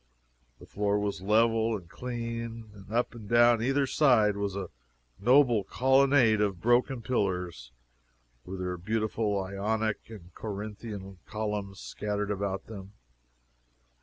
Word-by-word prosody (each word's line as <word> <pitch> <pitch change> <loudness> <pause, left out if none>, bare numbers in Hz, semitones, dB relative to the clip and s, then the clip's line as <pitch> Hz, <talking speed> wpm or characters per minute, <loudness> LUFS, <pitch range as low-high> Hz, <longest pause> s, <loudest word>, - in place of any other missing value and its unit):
The - - -14
floor 105 0 0
was 100 -4 -2
level 115 +2 +2
and 90 -4 -13
clean, 115 -1 -5
and 100 -1 -14
up 120 +1 0
and 110 -4 -10
down 120 -1 +5
either 135 +3 +2
side 120 -8 +4
was 100 -1 -2
a 100 -2 -5 0.5
noble 120 -1 +4
colonnade 130 -1 +4
of 100 -4 0
broken 120 +2 +2
pillars, 90 - -2 0.7
with 95 0 -6
their 90 -1 -3
beautiful 110 +2 -1
Ionic 105 +4 -2
and 90 -6 -12
Corinthian 105 -2 -7
columns 105 -2 -4
scattered 105 0 -3
about 100 -1 -2
them. 100 -2 -10
105 Hz, 125 wpm, -29 LUFS, 100-115 Hz, 0.7 s, down